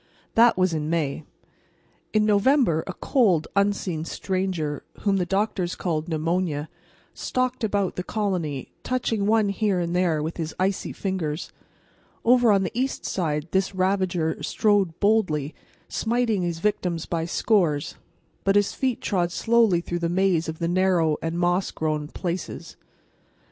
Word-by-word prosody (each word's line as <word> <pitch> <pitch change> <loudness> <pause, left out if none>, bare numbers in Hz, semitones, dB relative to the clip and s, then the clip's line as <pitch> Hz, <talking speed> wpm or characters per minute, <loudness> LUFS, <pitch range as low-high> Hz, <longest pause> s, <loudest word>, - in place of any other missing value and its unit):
That 235 -2 +5
was 185 -2 +2
in 155 -1 -2
May. 155 -3 -1 0.9
In 215 -1 +3
November 210 - +3
a 190 - -4
cold, 190 - +2
unseen 200 -5 0
stranger, 180 -4 -2 0.2
whom 200 -2 +2
the 180 -2 -1
doctors 195 -2 0
called 160 -2 -2
Pneumonia, 160 -1 -1 0.4
stalked 255 -1 -2
about 200 -3 0
the 180 - -2
colony, 180 - -2
touching 225 -5 -1
one 215 -1 +3
here 200 -2 0
and 170 0 -2
there 170 -4 +1
with 160 +2 -4
his 160 -2 -4
icy 190 +1 0
fingers. 175 -5 -3 0.7
Over 245 -1 +5
on 195 -1 +3
the 185 - -2
east 260 +3 -2
side 155 -4 -1
this 190 0 0
ravager 185 -4 0
strode 205 -6 +1
boldly, 185 -9 +1 0.3
smiting 230 -3 0
his 170 -2 -2
victims 175 -3 -1
by 165 -1 -2
scores, 170 -6 +1 0.5
but 195 0 +2
his 205 -1 +3
feet 260 -3 -1
trod 175 -4 0
slowly 225 -4 +3
through 175 0 -3
the 170 -1 -1
maze 175 -2 +1
of 160 - -5
the 165 - -1
narrow 175 -4 +2
and 165 +1 -2
moss 175 +2 +1
grown 155 -1 -2
"places." 175 +3 -5
Mr. - - -34
185 Hz, 150 wpm, -24 LUFS, 165-205 Hz, 0.9 s, That